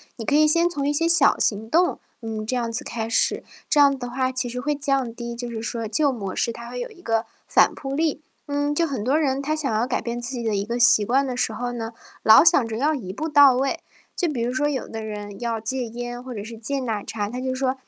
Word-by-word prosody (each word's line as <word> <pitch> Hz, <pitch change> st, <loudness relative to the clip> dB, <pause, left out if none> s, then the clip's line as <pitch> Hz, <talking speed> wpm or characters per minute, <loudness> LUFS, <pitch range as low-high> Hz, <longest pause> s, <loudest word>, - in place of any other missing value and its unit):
你 225 Hz, -, -7 dB
可 285 Hz, -, 0 dB
以 305 Hz, +1 st, +5 dB
先 335 Hz, +3 st, +4 dB
从 285 Hz, -5 st, -2 dB
一 -, -, +2 dB
些 330 Hz, +3 st, +1 dB
小 335 Hz, -4 st, +5 dB
行 220 Hz, +1 st, 0 dB
动， 355 Hz, +5 st, +2 dB, 0.2 s
嗯， 220 Hz, -1 st, -4 dB
这 250 Hz, +4 st, -2 dB
样 235 Hz, -2 st, -1 dB
子 225 Hz, -, -4 dB
开 225 Hz, -1 st, -4 dB
始， 230 Hz, -, +1 dB, 0.3 s
这 295 Hz, -, +3 dB
样 280 Hz, -1 st, +6 dB
的 245 Hz, -1 st, -5 dB
话 260 Hz, +1 st, -1 dB
其 250 Hz, -1 st, -2 dB
实 250 Hz, +1 st, -4 dB
会 295 Hz, +3 st, 0 dB
降 275 Hz, -4 st, -1 dB
低 235 Hz, 0 st, -6 dB
就 240 Hz, 0 st, -5 dB
是 220 Hz, -1 st, -5 dB
说 230 Hz, 0 st, -3 dB
旧 280 Hz, +6 st, +2 dB
模 200 Hz, -6 st, -5 dB
式 235 Hz, -, 0 dB
它 235 Hz, +1 st, -9 dB
会 250 Hz, -, -5 dB
有 -, -, -4 dB
一 355 Hz, -5 st, -17 dB
个 225 Hz, 0 st, 0 dB, 0.2 s
反 -, -, +4 dB
扑 270 Hz, -1 st, -5 dB
力。 310 Hz, 0 st, 0 dB, 0.3 s
嗯， 290 Hz, +1 st, 0 dB
就 330 Hz, +2 st, +1 dB
很 260 Hz, -7 st, -3 dB
多 265 Hz, +5 st, +1 dB
人 275 Hz, -2 st, 0 dB
他 310 Hz, +2 st, 0 dB
想 290 Hz, -6 st, -2 dB
要 220 Hz, +3 st, +1 dB
改 -, -, -1 dB
变 235 Hz, 0 st, -4 dB
自 240 Hz, +2 st, -5 dB
己 245 Hz, -2 st, -4 dB
的 220 Hz, -3 st, -1 dB
一 200 Hz, +1 st, -1 dB
个 235 Hz, +2 st, -3 dB
习 220 Hz, -3 st, +5 dB
惯 270 Hz, +4 st, +2 dB
的 250 Hz, -1 st, -4 dB
时 225 Hz, -, 0 dB
候 245 Hz, +2 st, -3 dB
呢， 230 Hz, -1 st, -5 dB, 0.3 s
老 220 Hz, +7 st, +8 dB
想 265 Hz, -8 st, +5 dB
着 220 Hz, 0 st, -4 dB
要 300 Hz, +4 st, +1 dB
一 190 Hz, -8 st, -6 dB
步 315 Hz, +7 st, -3 dB
到 285 Hz, -3 st, +7 dB
位。 270 Hz, +1 st, 0 dB, 0.4 s
就 355 Hz, -, 0 dB
比 265 Hz, -7 st, -2 dB
如 240 Hz, +1 st, 0 dB
说 290 Hz, +3 st, 0 dB
有 280 Hz, -3 st, -2 dB
的 220 Hz, -1 st, -6 dB
人 205 Hz, -1 st, -7 dB
要 230 Hz, -2 st, -2 dB
戒 250 Hz, +3 st, -3 dB
烟 240 Hz, +1 st, -6 dB
或 255 Hz, -1 st, -7 dB
者 205 Hz, -2 st, -6 dB
是 225 Hz, +1 st, -9 dB
戒 275 Hz, +5 st, -3 dB
奶 225 Hz, -5 st, -3 dB
茶， 205 Hz, -2 st, -3 dB
他 250 Hz, +2 st, -5 dB
就 260 Hz, 0 st, -2 dB
说： 260 Hz, 0 st, 0 dB
245 Hz, 290 characters per minute, -23 LUFS, 225-280 Hz, 0.4 s, 老